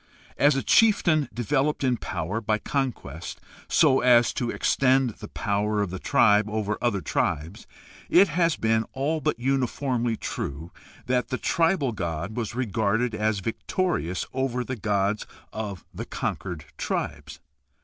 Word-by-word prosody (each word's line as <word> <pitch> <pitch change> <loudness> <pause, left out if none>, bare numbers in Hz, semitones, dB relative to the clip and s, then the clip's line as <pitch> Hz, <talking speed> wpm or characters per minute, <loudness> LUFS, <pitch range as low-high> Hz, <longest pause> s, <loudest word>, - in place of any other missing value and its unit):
As 145 0 +5
a 135 - -1
chieftain 170 -9 +4
developed 140 +5 0
in 130 -2 +2
power 90 +1 -3
by 110 0 +1
conquest 105 - -4 0.3
so 140 -4 +4
as 120 -1 +5
to 120 - -2
extend 130 -1 +2
the 105 0 -10
power 105 +1 -1
of 100 -4 -1
the 95 - -5
tribe 105 +2 +4
over 105 -1 -1
other 110 -6 +1
tribes, 80 +4 -2 0.4
it 190 +3 +6
has 170 0 +2
been 110 0 +1
all 150 +4 -1
but - - 0
uniformly 125 -2 0
true 80 +5 -5 0.3
that 125 0 +1
the 130 - -2
tribal 165 -5 +1
god 85 0 -4
was 120 -1 -3
regarded 115 0 0
as 110 -2 0
victorious 115 - -2
over 130 -1 -1
the 130 - -4
gods 105 -1 0 0.3
of 105 -4 -5
the - - -6
conquered 85 -5 -4
tribes. 75 0 -3
115 Hz, 140 wpm, -26 LUFS, 100-135 Hz, 0.4 s, it